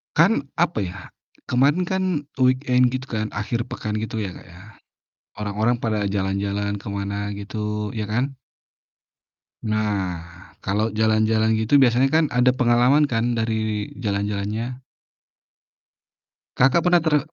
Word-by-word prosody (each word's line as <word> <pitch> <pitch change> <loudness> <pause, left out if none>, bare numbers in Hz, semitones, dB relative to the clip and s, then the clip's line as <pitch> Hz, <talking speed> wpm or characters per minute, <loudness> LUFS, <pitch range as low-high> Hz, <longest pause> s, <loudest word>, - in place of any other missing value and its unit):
Kan, 165 -3 +3
apa 170 -6 +1
ya, 95 -1 -3 0.5
kemarin 140 +8 +3
kan 190 +1 -1 0.4
weekend 125 -1 +3
gitu 130 +1 -3
kan, 110 0 -1
akhir 115 +2 -2
pekan 105 -3 -4
gitu 110 0 -3
ya, 95 - -3
Kak, - - -12
ya. 90 -1 -14 0.8
Orang-orang 110 +4 +1
pada 110 -3 0
jalan-jalan 100 +1 -1
ke 105 - -9
mana 100 0 -3
gitu 105 +1 -4
ya 110 -2 -3
kan? 125 +5 -1 1.3
Nah, 105 -5 -1 0.4
kalau 105 +4 -1
jalan-jalan 110 +1 +2
gitu 110 +6 +3
biasanya 130 0 +4
kan 160 +2 +4
ada 125 0 +5
pengalaman 125 +4 +4
kan 120 -2 0
dari 110 -2 -1
jalan-jalannya? 105 +3 -3 1.8
Kakak, 135 +7 +4
pernah 175 -2 +5
tre 155 -2 +3
110 Hz, 125 wpm, -23 LUFS, 105-125 Hz, 1.8 s, ada